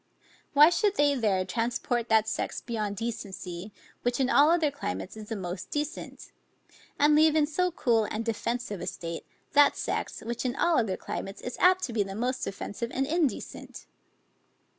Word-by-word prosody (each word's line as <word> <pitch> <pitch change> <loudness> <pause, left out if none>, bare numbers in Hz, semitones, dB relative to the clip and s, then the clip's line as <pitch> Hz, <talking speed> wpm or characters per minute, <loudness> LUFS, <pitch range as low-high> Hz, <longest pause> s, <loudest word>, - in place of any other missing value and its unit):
Why 300 +3 +8
should 410 +2 +2
they 290 -4 +4
there 205 -8 +1
transport 235 +3 -1
that 220 -1 +4
sex - - -2
beyond 215 -4 -3
decency, 195 -4 -5 0.3
which 245 +1 0
in 260 -1 +2
all 290 +2 +6
other 330 -3 +3
climates 95 - -5
is 215 -1 -9
the 225 - -2
most 185 -2 -5
decent? 295 +1 -5 0.7
And 295 +1 +5
leave 310 +1 +5
in 305 -2 +4
so 360 +5 0
cool 235 -10 +2
and 220 +2 -3
defensive 230 -2 -2
a - - -5
state, 165 -1 -5 0.2
that 290 0 +5
sex, - - -3
which 235 +1 -4
in 255 0 -1
all 340 -3 +3
other 210 -5 -1
climates 195 +1 -6
is 250 - -5
apt 370 +1 +5
to 245 - -3
be 220 - +1
the 195 -1 -3
most 250 +4 -1
offensive 205 +4 -4
and 270 +1 0
indecent? 310 -2 -2
240 Hz, 175 wpm, -28 LUFS, 210-290 Hz, 0.7 s, Why